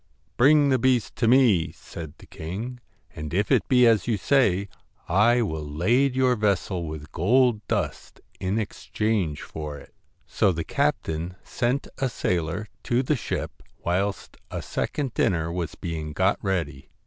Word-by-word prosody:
'Bring 145 +3 +5
the 130 -1 +3
beast 120 -5 +1
to 115 - +2
me,' 115 -10 +4
said 80 -3 -9
the - - -15
king, 110 +10 -6 0.4
'and 75 +2 -5
if 100 +1 +1
it - - +3
be 125 -1 +5
as 115 -3 +4
you 115 -3 +1
say, 100 -4 +2 0.4
I 115 +7 +4
will 80 -7 -3
lade 115 - +1
your 130 -1 +3
vessel 100 -5 0
with 75 -1 -7
gold 115 +5 +3
dust - - -3 0.2
in 95 +3 -1
exchange 105 -5 -2
for 75 -2 -6
it.' - - -15 0.3
So 95 - +2
the 85 -1 -3
captain 80 +4 -1
sent 125 +4 -1
a 135 -2 +1
sailor 90 -2 -1 0.2
to 125 +2 +2
the 150 +4 +1
ship, 125 - -4 0.2
whilst 95 +3 -1
a - - -5
second 140 -5 -2
dinner 80 -2 +1
was 85 -3 -3
being 80 -3 -5
got 95 +5 +2
ready. 80 -9 -2
100 Hz, 155 wpm, -25 LUFS, 85-120 Hz, 0.4 s, Bring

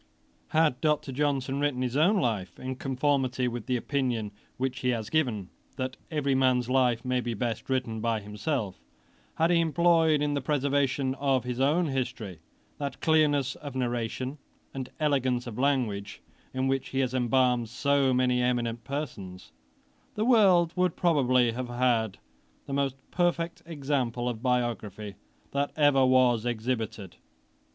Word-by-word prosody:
Had 155 -5 +2
Dr. 150 -3 +1
Johnson 140 -1 -1
written 145 -3 0
his 125 0 -2
own 180 +8 +4
life, 105 - -2
in 130 0 -4
conformity 130 -1 0
with 120 -3 -5
the 125 - +1
opinion 120 -5 -1 0.3
which 130 0 -2
he 125 - 0
has 115 -3 -2
given, 120 - 0 0.3
that 130 -1 -3
every 145 -3 0
man's 130 -2 +2
life 125 -2 +2
may 125 0 +1
be 120 -1 -3
best 115 +2 -3
written 125 -4 -1
by 115 -1 0
himself; 105 - -3 0.6
had 165 +2 +2
he 170 - +4
employed 165 -2 +3
in 145 0 0
the 140 - -1
preservation 140 -1 0
of 135 -3 +1
his 125 0 -4
own 150 +6 +3
history, 125 - -3 0.4
that 140 -2 -4
clearness 145 -4 +2
of 145 -3 -8
narration 125 +2 -2 0.3
and 130 -2 -5
elegance 130 -5 +1
of 120 -1 -7
language 115 -8 -1 0.3
in 130 0 -1
which 135 -1 -1
he 135 - -2
has 130 -1 -1
embalmed 125 -2 +2
so 140 +2 +2
many 125 0 +2
eminent 120 -2 -1
persons, 115 -10 -6 0.6
the 215 - 0
world 190 -9 +5
would 180 -2 +1
probably 130 -8 +3
have 125 +1 -5
had 120 -4 +1 0.5
the 140 - -6
most 135 -1 0 0.2
perfect 170 -1 0
example 135 -6 -2
of 115 -3 -3
biography 120 -5 -2 0.4
that 140 +1 -1
was 130 -5 +4
ever - - +2
exhibited. 110 -5 -3
130 Hz, 150 wpm, -28 LUFS, 120-145 Hz, 0.6 s, world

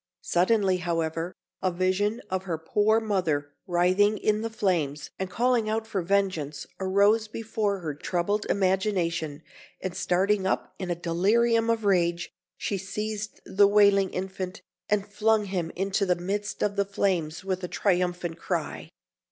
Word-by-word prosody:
Suddenly, 190 +1 +2
however, 165 0 -2 0.3
a 185 - +1
vision 185 +5 0
of 190 0 -1
her 170 -4 -2
poor 210 +7 +2
mother 175 -10 -1 0.2
writhing 185 +4 +3
in 215 +1 +1
the 230 - -2
flames 160 -10 -1
and 190 -1 -2
calling 235 +1 +1
out 220 +1 -1
for 210 -4 -2
vengeance 170 -6 0
arose 200 +3 +3
before 215 -3 -2
her 155 -3 -3
troubled 180 +7 -1
imagination, 180 -6 0 0.4
and 185 -1 -4
starting 190 +2 +1
up - - -1
in 185 -2 -4
a 175 - 0
delirium 225 +8 +2
of 225 -2 0
rage, 175 -3 +1 0.3
she 200 - -2
seized 210 +2 -4
the 200 +1 +4
wailing 200 -1 +5
infant, 185 +1 -5 0.3
and 205 -1 +1
flung 210 +1 +2
him 185 -4 -2
into 195 +2 0
the 180 -2 +2
midst 200 +4 -3
of 205 -1 0
the 200 - +2
flames, 185 -5 -1
with 190 -1 -2
a - - -1
triumphant 180 -3 0
cry. - - -3
190 Hz, 150 wpm, -27 LUFS, 175-210 Hz, 0.4 s, wailing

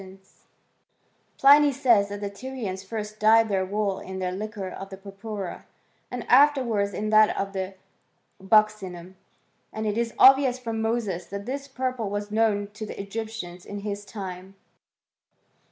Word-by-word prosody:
"* - - -43
Pliny 285 +1 +7
says 240 -7 +3
that 205 0 -6
the 200 - -3
Tyrians 205 -4 -6
first 215 +1 -6
dyed 220 +1 +5
their 190 -2 +1
wool 200 0 -1
in 190 0 -7
the 185 -1 -2
liquor 205 0 -5
of 195 +1 -8
the 190 - -9
purpura, 195 0 -7 0.4
and - - -5
afterwards 250 -9 +4
in 215 +3 -3
that 215 0 +5
of 195 0 -3
the 190 0 -4 0.7
buccinum; 190 -3 +1 0.6
and 220 0 -4
it 210 +1 0
is 235 -1 -2
obvious 265 -1 +6
from 230 -3 -4
Moses 220 -6 -2
that 200 +1 -6
this 275 +3 -4
purple 255 -5 -3
was 205 +1 -4
known 210 -2 +1
to 215 - -7
the - - -8
Egyptians 200 -3 -6
in 205 0 -7
his 205 0 -4
time. 190 -2 -8
210 Hz, 155 wpm, -25 LUFS, 195-225 Hz, 0.7 s, Pliny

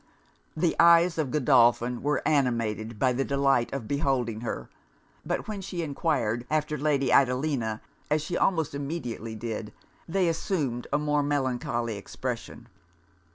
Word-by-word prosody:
The 165 0 +1
eyes 170 0 +6
of 150 -4 0
Godolphin 120 -3 +3
were 145 +2 0
animated 115 -6 0
by 130 +3 +2
the 135 +2 0
delight 135 -3 +1
of 130 -5 -4
beholding 130 -6 0
her. 120 - -4 0.6
But - - -3
when 210 -2 -4
she 180 -3 -4
enquired 140 -6 -1
after 150 0 0
Lady 140 -3 +1
Adelina, 125 -4 +2 0.3
as 150 0 +1
she 170 +3 -3
almost 165 -7 +1
immediately 140 -6 -4
did, 110 -1 -5 0.4
they 180 +1 +1
assumed 155 - -1
a - - +3
more 150 0 +1
melancholy 125 -5 -1
expression. 100 - -6
140 Hz, 135 wpm, -27 LUFS, 120-155 Hz, 0.6 s, eyes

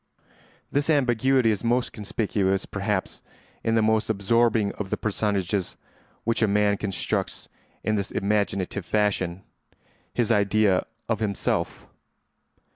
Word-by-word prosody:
This 145 +2 +1
ambiguity 130 -3 +3
is 105 0 -2
most 120 +1 +1
conspicuous, 100 -2 -1
perhaps, 100 -1 -2 0.4
in 115 - +1
the 110 - +3
most 110 0 +2
absorbing 110 0 +2
of 100 -2 -6
the - - -1
personages 100 -3 -1 0.5
which 115 +1 0
a 110 - +4
man 105 0 +2
constructs 95 -3 -2 0.4
in 110 0 +1
this 100 -1 -2
imaginative 100 -1 -1
fashion—his 105 +4 -3
idea 100 -2 +3 0.2
of 110 -3 0
himself. 105 -3 -2
105 Hz, 115 wpm, -25 LUFS, 100-115 Hz, 0.5 s, a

